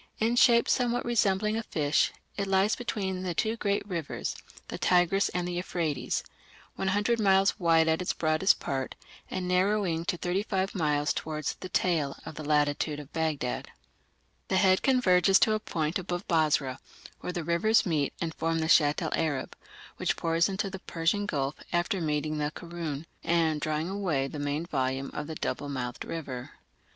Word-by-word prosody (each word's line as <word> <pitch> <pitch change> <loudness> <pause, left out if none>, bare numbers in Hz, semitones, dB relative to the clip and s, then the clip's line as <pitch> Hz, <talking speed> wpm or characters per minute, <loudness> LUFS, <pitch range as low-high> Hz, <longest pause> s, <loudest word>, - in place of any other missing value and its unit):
In 230 +2 +1
shape 235 -1 +5
somewhat 245 -1 +1
resembling 215 -2 +2
a - - -1
fish, 150 -8 +1 0.2
it 200 -1 -2
lies 195 +2 +3
between 190 -6 -3
the 180 -2 -3
two 220 +4 0
great 200 -2 -1
rivers, 170 -6 -3 0.3
the - - -5
Tigris 180 +2 +3
and 175 0 -2
the 180 - -3
Euphrates, 170 -4 -2 0.5
100 205 +5 +1
miles 195 -1 +3
wide 165 -2 +4
at 160 +2 +2
its 180 - 0
broadest 155 +4 +2
part, 135 -1 -3 0.3
and 185 -1 -3
narrowing 180 -2 +1
to 175 -1 -1
35 190 +2 -1
miles 150 -4 +1
towards 155 -2 -3
the 185 - -9
"tail" 160 -7 0
in - - -7
the 155 - -7
latitude 150 0 +1
of 145 0 -11
Baghdad; 155 -6 -2 0.8
the 190 - +1
"head" 185 0 +4
converges 195 -7 +4
to 220 - +4
a 215 - +1
point 160 -4 -2
above 175 0 -4
Basra, 150 -6 +1 0.4
where - - -4
the 175 -2 -3
rivers 185 +7 +3
meet 155 -6 0
and 165 -1 -2
form 165 +1 -1
the 160 0 0
Shatt 150 -2 +4
el - - -2
Arab, 145 -5 -1 0.4
which - - 0
pours 165 +2 +2
into 195 0 -2
the 190 - -6
Persian 175 +5 -1
Gulf 140 -5 -1 0.2
after 175 +2 0
meeting 155 -1 -1
the 150 0 0
Karun 165 -2 -6 0.2
and 160 -3 +1
drawing 155 +1 -1
away 175 -9 -1
the 145 - -7
main 145 +3 -2
volume 135 -3 -2
of 150 - -4
that 160 -1 -7
double 145 - -2
mouthed 125 -3 -4
river. 135 -7 -6
170 Hz, 170 wpm, -28 LUFS, 150-195 Hz, 0.8 s, shape